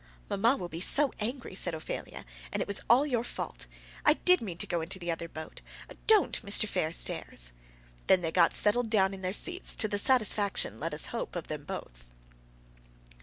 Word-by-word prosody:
"Mamma 230 +7 +3
will 180 - -5
be 165 0 -6
so 285 +8 +4
angry," 235 +1 -3
said 175 -3 -1
Ophelia, 160 - -6 0.3
"and - - -2
it - - -1
was 200 - +1
all 250 +5 +6
your 245 -5 0
fault. 60 - -6 0.4
I - - +6
did 360 +3 +4
mean 185 -7 -5
to - - -1
go 170 -1 -2
into 170 +4 -4
the 175 -2 -3
other 165 0 -4
boat. 160 0 -8 0.5
Don't, 430 - +4
Mr. 205 +1 +3
Fairstairs." 155 - -2 0.6
Then 190 -1 +5
they 165 -2 -2
got 170 0 +3
settled 225 +2 +1
down 195 -3 +2
in 190 - -8
their 185 0 -2
seats, 360 - +1
to 215 - +1
the 205 -1 -1
satisfaction, 205 - +1
let 160 0 -3
us 150 - +3
hope, 230 - -4
of 175 - -5
them 150 -2 -5
both. - - -8
190 Hz, 190 wpm, -30 LUFS, 165-235 Hz, 0.6 s, all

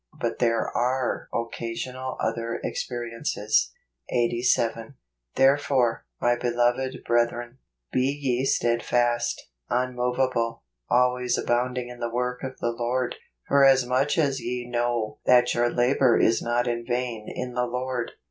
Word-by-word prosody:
But - - -2
there 115 -1 +2
are 125 +1 0
occasional 120 +3 -4
other 115 +1 -2
experiences. 115 - -1 0.4
Eighty 120 -1 +1
Seven. 115 +1 0 0.2
" - - -50
Therefore, 135 -3 +2
my 120 0 +3
beloved 120 +2 0
brethren, 120 +1 0 0.3
be 130 +1 +2
ye 130 -2 0
steadfast, 120 -1 +1 0.2
immovable, 125 -1 0 0.3
always 125 0 +2
abounding 125 +1 -1
in 125 0 -10
the 120 -1 -2
work 125 +1 -2
of 130 -1 -6
the 120 - -1
Lord, 120 +2 -2 0.3
for 140 0 +4
as 135 -2 +6
much 130 +5 +1
as 140 -4 +1
ye 125 0 -4
know 120 -2 -1
that 125 -1 +5
your 120 0 +2
labor 125 0 +3
is 115 - +3
not 120 +1 0
in 120 -1 -1
vain 120 -3 -3
in 125 0 -5
the 125 0 0
Lord." 125 0 -3
120 Hz, 135 wpm, -25 LUFS, 120-125 Hz, 0.4 s, as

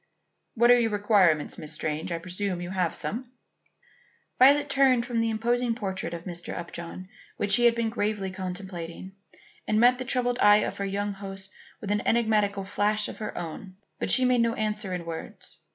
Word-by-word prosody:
"What 240 +1 +5
are 245 - +6
your 230 -1 +1
requirements, 205 -7 +2
Miss 155 0 -3
Strange? 155 +1 -3
I 170 - -1
presume 185 +2 -3
you 175 +1 -6
have 180 -3 -1
some." 245 +3 -4 1.1
Violet 285 +3 +6
turned 265 -3 +3
from 240 -2 -2
the 230 0 +1
imposing 235 +2 0
portrait 195 -4 -4
of 165 - -8
Mr. 175 -2 -6
Upjohn 170 +1 -7 0.3
which 205 - 0
she 240 +4 +5
had 235 -1 +5
been 230 -1 -1
gravely 205 -3 -2
contemplating, 185 -1 -6 0.6
and 215 - +2
met 250 +2 +5
the 255 - -4
troubled 245 -1 0
eye 205 0 +6
of - - -5
her 200 - -2
young 200 +1 -2
host 195 -1 -8 0.3
with 205 - -4
an 205 0 +1
enigmatical 210 -4 +1
flash 210 +2 0
of - - -9
her 215 - -5
own. 175 +3 -7 0.2
But - - -2
she 255 - +6
made 250 -1 +3
no 230 0 +1
answer 210 -2 -2
in 180 -2 -4
words. 165 -1 -8
205 Hz, 185 wpm, -26 LUFS, 185-235 Hz, 1.1 s, are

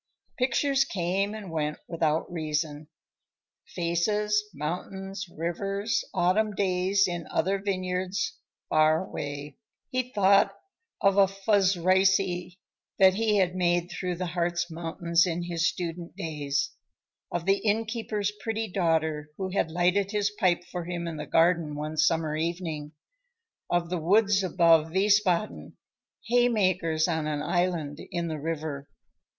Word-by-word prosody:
Pictures 270 +2 +2
came 195 -1 -1
and 205 -5 -8
went 150 -2 -2
without 160 -2 0
reason. 155 -2 -2 0.9
Faces, 210 +5 +1
mountains, 190 +5 -5
rivers, 195 +6 -2
autumn 195 +3 +1
days 190 +1 +2
in 175 -2 -4
other 195 +3 0
vineyards 185 -1 -2 0.3
far 155 +3 +3
away. 145 -2 -6 0.3
He 255 -1 -1
thought 200 -2 +4 0.4
of 195 0 +3
a 195 -1 +6
Fuszreise 190 -1 +3 0.8
he 205 +3 +4
had 185 -2 +2
made 175 0 +1
through 180 +1 -3
the 180 +1 -3
Hartz 175 0 -1
Mountains 170 +1 +1
in 175 0 -2
his 170 -1 0
student 170 -1 -6
days; 145 -3 -2 0.6
of 175 -1 -2
the 195 +1 +4
innkeeper's 220 -1 -1
pretty 225 0 -2
daughter 160 -4 0
who 190 -1 -3
had 185 -3 0
lighted 180 +4 +1
his 210 0 0
pipe 185 -5 +1
for 175 -2 -4
him 175 -1 -4
in 165 -2 -5
the 150 -1 -6
garden 165 -2 +2
one 150 +1 -4
summer 155 0 +2
evening, 160 -2 -3 0.8
of 175 0 0
the 180 - 0
woods 200 +4 +3
above 165 -3 +4
Wiesbaden, 190 - +1 0.5
haymakers 185 -9 +2
on 160 -3 -1
an 150 -1 -2
island 170 -5 -1
in 170 -1 -2
the 155 -1 -4
river. 150 -2 -4
175 Hz, 125 wpm, -27 LUFS, 160-195 Hz, 0.9 s, a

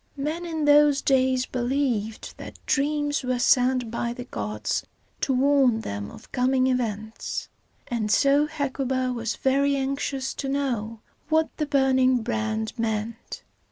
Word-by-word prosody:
Men 310 +5 -3
in 320 -2 -2
those 290 -1 +6
days 260 -1 +2
believed 245 -4 -2
that - - -9
dreams 290 +1 +1
were 255 0 0
sent 250 -1 +3
by 235 0 -2
the 245 - -7
gods 105 - -3 0.4
to - - 0
warn 265 -3 +3
them 100 - -5
of - - -14
coming 255 +1 +2
events, 220 -4 -2 0.4
and 225 -3 -2
so 280 +7 +4
Hecuba 265 -4 -1
was 230 -2 -3
very 280 +1 +2
anxious 270 0 -2
to 270 - -4
know 235 -6 -2 0.3
what 320 0 +1
the 300 - -1
burning 260 -3 +3
brand 220 -1 -2
meant. 225 +1 -3
255 Hz, 135 wpm, -25 LUFS, 230-280 Hz, 0.4 s, those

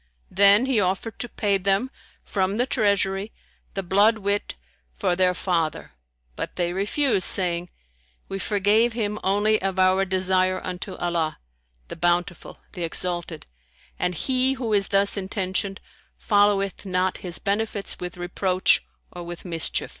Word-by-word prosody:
Then 200 +5 +6
he 260 -4 +2
offered 195 +3 -2
to 240 - -3
pay 200 -4 0
them, 195 +7 0 0.3
from 195 +1 -1
the 245 - +2
Treasury, 200 -4 0 0.4
the 195 - -2
blood 205 +5 +4
wit 205 -1 -2 0.4
for 175 - +1
their 180 0 +2
father; 170 -4 -2 0.4
but - - -5
they 175 -1 -1
refused, 205 +2 +1
saying, 175 -2 +2 0.6
"We 195 - -5
forgave 210 +4 +2
him 210 -2 -2
only 205 +3 +2
of 190 0 -2
our 185 +1 +4
desire 185 0 +2
unto 185 +1 -5
Allah,[FN#151] 60 - -5
the - - -6
Bountiful, 175 0 -1 0.2
the 175 - -5
Exalted; 170 -1 -3 0.5
and 180 0 0
he 260 +6 +1
who 245 -5 -3
is 200 -1 +3
thus 200 +1 +1
intentioned 195 0 -2 0.4
followeth 205 -2 +2
not 185 -1 -1
his 175 -2 -4
benefits 205 0 -2
with 180 -1 -6
reproach 180 - +1 0.3
or 175 - -8
with 175 +1 -8
mischief." 165 -3 0
190 Hz, 140 wpm, -24 LUFS, 180-205 Hz, 0.6 s, Then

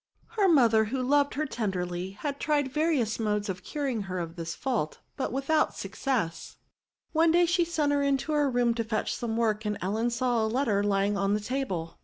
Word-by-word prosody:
Her 435 -4 +2
mother, 230 -9 +5
who 255 +5 -3
loved 280 +2 +2
her 305 +2 0
ten 220 -8 -2
derly, 180 +1 -4
had 285 -2 -4
tried 290 -3 0
various 300 -9 +1
modes 210 -1 -1
of 185 -1 -4
curing 275 -7 -2
her 185 - -3
of 165 -1 -4
this 165 -1 -5
fault, 240 - -2 0.2
but 265 - -2
without 275 +4 +1
success. 200 -3 -3 0.5
One 325 +1 +4
day 350 +1 +5
she 350 +1 +2
sent 315 -4 0
her 285 0 +2
into 280 +2 0
her 295 -2 +2
room 245 -2 +2
to 230 0 -2
fetch 220 -1 -2
some 225 -2 -3
work, 220 -2 +1
and 210 -1 -2
Ellen 215 +6 0
saw 240 -1 +1
a - - +1
letter 220 -4 +1
lying 200 0 +1
on 195 +1 +1
the - - 0
table. 205 -8 -3
235 Hz, 205 wpm, -28 LUFS, 205-285 Hz, 0.5 s, mother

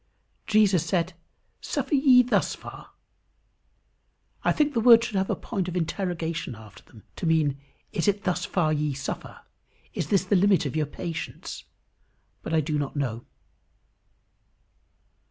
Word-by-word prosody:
Jesus 205 -6 +4
said, 170 +1 -1 0.5
"Suffer - - -3
ye 265 -3 +6
thus 245 - +1
far." - - -11 1.5
I - - +3
think 300 -1 +1
the 235 - +1
words 230 0 +7
should 215 - -5
have 190 0 0
a - - +1
point 195 -6 -4
of 180 - -5
interrogation 165 - -3
after 110 -1 -14
them, 110 - -18
to 170 - -2
mean, 150 -4 +2 0.3
"Is 195 -4 -1
it 205 0 +1
thus 180 -2 -1
far 175 -6 +1
ye 150 -2 -1
suffer?" 140 0 -6 0.5
"Is - - -3
this 195 -3 +2
the 200 - +2
limit 190 -3 +4
of 140 - -3
your 155 -2 0
patience?" 165 +2 -6 0.8
but - - -6
I 160 -1 +3
do 150 0 -1
not 145 0 -4
know. 120 -5 -3
175 Hz, 150 wpm, -26 LUFS, 150-205 Hz, 1.5 s, words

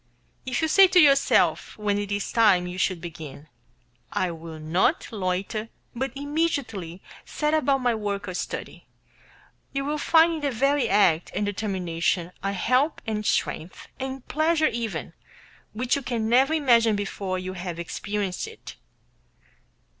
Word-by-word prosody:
If 255 +4 -1
you - - +3
say 385 +4 +7
to 365 0 +4
yourself, 275 -6 +3
when 205 -1 0
it 205 0 -4
is 205 0 -2
time 205 -6 +4
you 180 +1 -6
should 185 -3 0
begin, 160 -3 -9 0.6
"I 185 -2 0
will 165 -1 -9
not 170 - +1
loiter, 200 +2 -2 0.2
but 260 +1 -3
immediately 280 - -2 0.2
set 300 0 -2
about 275 -3 +2
my 245 -1 +3
work 205 -2 -3
or 185 - -4
study," - - -6 0.9
you 275 0 -2
will 300 +1 -2
find 330 +2 +4
in 315 - -4
the 285 - 0
very 275 +3 +1
act 185 -5 +3
and 205 - 0
determination 180 -4 -1
a 195 - -1
help 255 - +1
and 215 -1 -2
strength, 170 -4 -2
and 265 -1 -5
pleasure 315 +1 +2
even, 215 -9 -4 0.6
which 245 +3 0
you 280 - -2
can 235 -4 -2
never 265 +7 +4
imagine 235 -7 +4
before 195 -2 -3
you 185 0 -5
have 175 -2 -5
experienced 195 +3 -3
it. - - -11
215 Hz, 150 wpm, -25 LUFS, 185-275 Hz, 0.9 s, say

